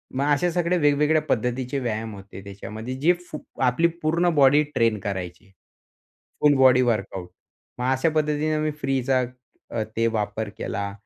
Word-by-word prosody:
मग 135 +2 0
अशा 175 +5 +1
सगळ्या 175 +1 +1
वेगवेगळ्या 150 +1 +3
पद्धतीचे 125 +3 -1
व्यायाम 110 -3 -3
होते 100 0 -11
त्याच्यामध्ये, 110 +5 -7
जे 155 +7 +3 0.2
फु 150 - -5 0.3
आपली 130 +7 +3
पूर्ण 170 +3 +2
बॉडी 145 +1 +6
ट्रेन 115 -2 +2
करायची. 95 0 -6 0.9
Full 150 -1 +5
body 130 -1 +6
workout. 100 -7 -1 0.5
मग 125 - -1
अशा 130 +5 +2
पद्धतीनं 155 0 +1
मी 155 - 0
फ्रीचा 130 -1 +1 0.5
अ, 115 -2 -1
ते 115 - +2
वापर 105 0 -2
केला. 100 0 -3
130 Hz, 145 wpm, -24 LUFS, 110-150 Hz, 0.9 s, बॉडी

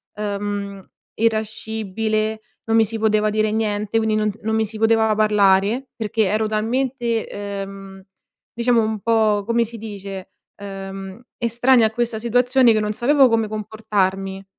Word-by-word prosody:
ehm, 200 -1 -4 0.3
irascibile, 220 -1 -1 0.2
non 225 0 +1
mi 225 - +5
si 225 +2 -5
poteva 215 -1 +2
dire 215 0 +1
niente, 210 0 -1
quindi 220 -1 +1
non 215 -1 +1
non 220 +1 -1
mi 220 - +1
si 215 +1 -9
poteva 225 -1 +3
parlare 210 +3 +3
perché 220 -1 -1
ero 215 +3 0
talmente, 235 +2 -1
ehm, 195 -1 -7 0.5
diciamo 235 -1 +2
un 220 -1 -2
po' 220 -2 +2
come 235 0 +1
si 230 +1 -10
dice, 200 -3 -8 0.3
ehm, 195 +1 -8 0.2
estranea 235 +1 +3
a - - -6
questa 235 -1 -2
situazione 245 +2 +3
che 215 - +2
non 210 0 -1
sapevo 270 +4 +4
come 225 -2 +1
comportarmi. 195 -3 -2
215 Hz, 145 wpm, -21 LUFS, 205-225 Hz, 0.5 s, mi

